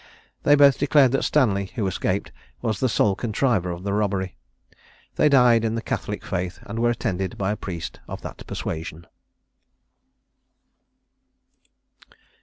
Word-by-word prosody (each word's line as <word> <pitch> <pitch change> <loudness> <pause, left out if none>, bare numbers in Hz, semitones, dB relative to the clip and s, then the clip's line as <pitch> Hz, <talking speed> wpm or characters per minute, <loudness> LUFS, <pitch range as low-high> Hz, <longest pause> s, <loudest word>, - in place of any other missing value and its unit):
They 145 - +5
both 140 -2 +6
declared 140 -2 +4
that 135 - +1
Stanley, 105 -9 +2
who 110 -5 -1
escaped, 95 - -1 0.3
was 110 -3 -1
the 130 - +1
sole 105 -2 +2
contriver 110 -3 0
of 85 +1 -5
the 100 0 -2
robbery. 100 -3 -1 0.8
They 150 - +4
died 125 -5 +5
in 115 0 0
the 115 - -2
Catholic - - -4
faith, 90 0 -3
and 110 +3 -6
were 120 0 +3
attended 95 -6 -2
by 100 0 0
a - - -1
priest 85 -5 -6
of - - -7
that - - -9
persuasion. 80 +1 -5
105 Hz, 140 wpm, -24 LUFS, 95-125 Hz, 0.8 s, both